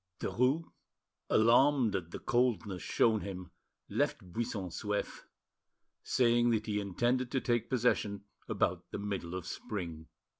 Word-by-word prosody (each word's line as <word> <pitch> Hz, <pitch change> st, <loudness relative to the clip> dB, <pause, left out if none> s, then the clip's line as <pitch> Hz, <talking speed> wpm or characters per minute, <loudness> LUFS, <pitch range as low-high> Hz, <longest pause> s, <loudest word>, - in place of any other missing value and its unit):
Derues, 130 Hz, +7 st, +1 dB, 0.7 s
alarmed 120 Hz, 0 st, +4 dB
at 90 Hz, -3 st, -3 dB
the -, -, -6 dB
coldness 120 Hz, -7 st, 0 dB
shown 110 Hz, -2 st, +2 dB
him, 90 Hz, -3 st, -6 dB, 0.4 s
left 90 Hz, -2 st, -1 dB
Buisson 110 Hz, -5 st, -2 dB
Souef, 105 Hz, +3 st, -3 dB, 0.8 s
saying 120 Hz, -1 st, +3 dB
that 110 Hz, -2 st, +1 dB
he 105 Hz, -1 st, -1 dB
intended 120 Hz, +6 st, 0 dB
to 135 Hz, -, 0 dB
take 120 Hz, -2 st, 0 dB
possession 110 Hz, -5 st, +1 dB, 0.3 s
about 90 Hz, -1 st, 0 dB
the -, -, -5 dB
middle 100 Hz, -4 st, -4 dB
of 90 Hz, -3 st, -5 dB
spring. 85 Hz, -6 st, -5 dB
110 Hz, 125 wpm, -32 LUFS, 95-120 Hz, 0.8 s, alarmed